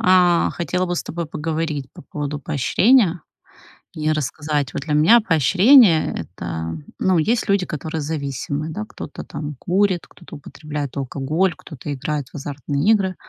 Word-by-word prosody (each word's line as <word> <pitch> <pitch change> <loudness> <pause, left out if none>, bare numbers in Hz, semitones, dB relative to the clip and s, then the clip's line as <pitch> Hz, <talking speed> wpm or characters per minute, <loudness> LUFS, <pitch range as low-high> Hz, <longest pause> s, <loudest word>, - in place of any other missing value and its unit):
А 180 -4 +4
хотела 180 +2 -1
бы 175 - -1
с - - -1
тобой 170 0 -5
поговорить 155 -2 -3
по - - -12
поводу 145 0 -5
поощрения 185 - +3 0.7
и 155 0 -1
рассказать. 150 -1 -2
Вот 140 - -4
для 155 -2 -2
меня 165 +11 +6
поощрение- 190 - +5 0.2
это, 80 -1 -4 0.2
ну, 185 -2 +2
есть 225 +6 0
люди, 200 -2 +2
которые 155 +1 -4
зависимы, 145 0 -3
да, 210 +7 -5
кто-то 145 - -8
там 150 -2 -6
курит, 185 -1 +1
кто-то 175 - -13
употребляет 145 -1 -6
алкоголь, 145 +7 -1
кто-то 145 -2 -8
играет 145 0 -3
в - - -17
азартные 145 - -1
игры. 190 -4 +2
155 Hz, 150 wpm, -21 LUFS, 145-185 Hz, 0.7 s, меня